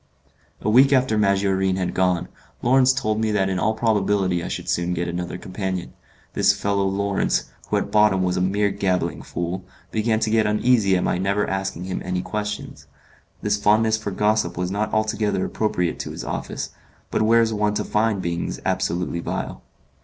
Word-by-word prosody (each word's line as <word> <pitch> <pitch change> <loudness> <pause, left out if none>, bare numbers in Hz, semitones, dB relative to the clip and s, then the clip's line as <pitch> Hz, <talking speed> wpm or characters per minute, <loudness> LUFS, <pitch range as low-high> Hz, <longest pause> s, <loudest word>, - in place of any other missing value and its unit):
A - - -4
week 135 +4 +6
after 130 -4 +3
Maggiorin 95 -2 +2
had 95 -1 -2
gone, 90 -2 +1 0.4
Lawrence 130 +1 +5
told 110 -5 -1
me 110 - +1
that 95 -2 +1
in 95 -1 -1
all 110 +3 +1
probability 100 -5 +1
I - - -4
should - - -5
soon 90 +1 0
get 85 0 -2
another 90 +1 -4
companion. 95 -1 -4 0.4
This - - +4
fellow 100 -1 0
Lawrence, 100 0 0 0.3
who - - +2
at - - -2
bottom 105 -3 +4
was 90 -1 0
a - - 0
mere 100 +2 +1
gabbling 90 -4 -1
fool, 90 +2 -4 0.3
began 110 0 +1
to 110 - 0
get 110 -1 +3
uneasy 105 -3 +3
at 90 - -1
my 90 - 0
never 100 +2 0
asking 95 -2 -3
him 95 0 -4
any 90 0 -2
questions. 105 +2 -5 0.6
This 105 0 0
fondness 110 +2 +4
for 110 - -4
gossip 105 -2 +1
was 90 +1 -2
not 105 +2 -1
altogether 110 -3 0
appropriate 90 -5 -1
to - - -4
his - - -6
office, - - -4 0.4
but - - +1
where 115 +2 +5
is 115 -1 0
one 105 0 0
to - - 0
find 105 -3 0
beings 85 0 -3
absolutely 85 0 -1
vile? - - -4
100 Hz, 185 wpm, -23 LUFS, 90-110 Hz, 0.6 s, week